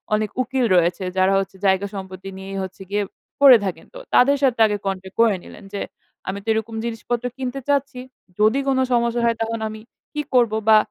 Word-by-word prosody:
অনেক 215 0 -1
উকিল 255 0 0
রয়েছে 175 +1 +2
যারা 190 +1 +4
হচ্ছে 195 0 -4
জায়গা-সম্পত্তি 190 -1 -1
নিয়েই 195 0 -7
হচ্ছে 190 +1 -9
গিয়ে 205 +1 0 0.4
পড়ে 270 -3 +10
থাকেন, 190 - -4
তো - - -9 0.2
তাদের 280 +3 +5
সাথে 250 -4 +2
আগে 210 -1 0
contact 190 -1 -4
করে 225 -4 +4
নিলেন - - -13
যে, 200 - -3 0.5
"আমি 195 +1 -3
তো 225 - -31
এরকম 220 +1 -3
জিনিসপত্র 235 +1 -3
কিনতে 260 +1 -4
চাচ্ছি। 280 -2 0 0.4
যদি 220 +6 +4
কোন 270 -1 +2 0.2
সমস্যা 235 0 +1
হয় 230 -1 +2
তখন 225 0 -2
আমি 215 0 -9 0.3
কি 300 - -1
করব? 240 -3 +4 0.2
বা 215 - +8
220 Hz, 185 wpm, -22 LUFS, 195-250 Hz, 0.5 s, পড়ে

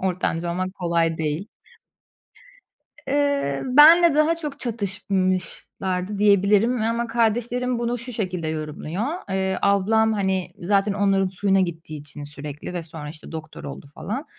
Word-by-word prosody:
ortanca 175 -2 -1
olmak 185 +2 -3
kolay 170 -3 0
değil. 160 +6 -2 1.6
Eee, 280 - +1
benimle 310 +5 +7
daha 305 +2 +3
çok 300 -4 -5
çatışmışlardı 190 -2 -2
diyebilirim. 205 +4 +4
E, 220 - -1
ama 235 +1 -1
kardeşlerim 240 +2 0
bunu 240 +1 -1
şu 245 +2 -6
şekilde 185 -7 -2
yorumluyor: 155 +5 -4 0.3
Eee, 190 0 0
ablam, 220 +3 +3
hani, 190 -3 -1
zaten 200 +3 +1
onların 195 -1 +2
suyuna 195 +1 +1
gittiği 165 -4 -4
için 145 0 -9
sürekli 145 +3 -7
ve 175 - -3
sonra, 160 -2 -8
işte, 155 +2 -11
doktor 160 -1 -8
oldu 140 0 -8
falan, 260 +8 -4
195 Hz, 135 wpm, -23 LUFS, 170-230 Hz, 1.6 s, benimle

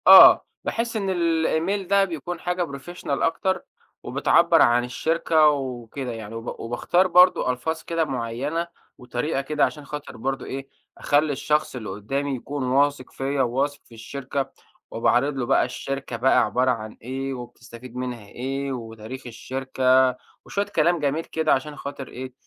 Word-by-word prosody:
آه، - - +10 0.2
باحس 230 0 -2
إن 195 -2 -1
الإيميل 170 +2 +1
ده 200 0 +4
بيكون 175 0 -5
حاجة 180 +1 -1
Professional 145 +6 -9
أكتر، 190 +3 0 0.4
وبتعبر - - +4
عن 120 +1 +5
الشركة 160 +4 +2
وكده 130 -2 -3
يعني. 110 -1 -7
وب 115 +1 -6
وباختار 150 +10 +1
برضه 180 -6 +5
ألفاظ 160 +6 -3
كده 165 -1 0
معيّنة 135 +6 -2 0.3
وطريقة 125 +3 -2
كده 150 +2 +2
عشان 150 -2 -6
خاطر 150 +1 -7
برضو 135 +2 -3
إيه، 135 +1 -6 0.3
أخلي 145 +1 +2
الشخص 150 +1 0
اللي 110 -5 -5
قدّامي 135 +8 -2
يكون 140 +2 -5
واثق 140 +1 +1
فيَّ، 135 +1 -2
وواثق 135 +3 0
في 115 - -15
الشركة. 135 +4 -4 0.4
وباعرض 125 +5 +2
له 125 - -1
بقى - - +3
الشركة 125 0 -3
عبارة 130 -1 +3
عن 110 -2 -5
إيه، 135 +3 -4
وبتستفيد 120 0 -10
منها 125 -4 -4
إيه، 135 +5 -4
وتاريخ 115 +1 -7
الشركة، 130 +1 +1 0.3
وشوية 200 0 -1
كلام 170 0 +2
جميل 150 +2 0
كده 160 -1 +1
عشان 145 +3 -2
خاطر 140 -2 -7
إيه؟ 130 0 -8
135 Hz, 145 wpm, -24 LUFS, 125-155 Hz, 0.4 s, آه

